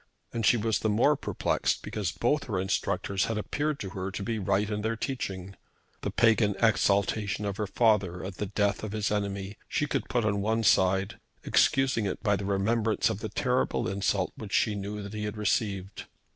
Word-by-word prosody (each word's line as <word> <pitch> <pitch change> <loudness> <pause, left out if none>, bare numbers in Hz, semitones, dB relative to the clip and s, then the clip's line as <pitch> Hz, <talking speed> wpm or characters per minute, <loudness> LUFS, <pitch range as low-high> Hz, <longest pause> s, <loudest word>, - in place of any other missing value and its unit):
And 115 -2 +1
she 120 - +5
was 110 0 0
the 110 - 0
more 120 +8 +4
perplexed - - -1
because 100 -6 -2
both 145 +5 0
her 100 -6 -2
instructors 95 0 0
had 115 - -2
appeared 145 +7 -2
to 95 - -4
her 95 0 -4
to 100 +1 -5
be 115 +1 -2
right 100 +1 +1
in 105 0 -2
their 115 +2 -1
teaching. 100 -6 -4 0.5
The - - -2
pagan 110 -3 +3
exaltation 105 -1 +2
of 100 -1 -3
her 105 - -2
father 100 -5 +2
at 95 -1 -6
the 105 - -2
death 100 0 0
of 110 -1 -4
his 105 -2 -1
enemy 100 -1 -2
she 145 - 0
could 145 - -2
put 120 -3 +1
on 100 -2 +1
one 110 +2 +1
side, 95 -1 +3 0.2
excusing 135 -6 +3
it 95 - -4
by 105 -3 +3
the 100 - -4
remembrance 110 +3 +1
of 105 - -4
the 110 - -4
terrible 125 -4 0
insult 95 -1 0
which 105 -3 -8
she 105 - +3
knew 100 +1 -5
that 100 +1 -8
he 105 0 -3
had 105 +1 -4
received. 100 -2 -1
105 Hz, 200 wpm, -28 LUFS, 100-110 Hz, 0.5 s, she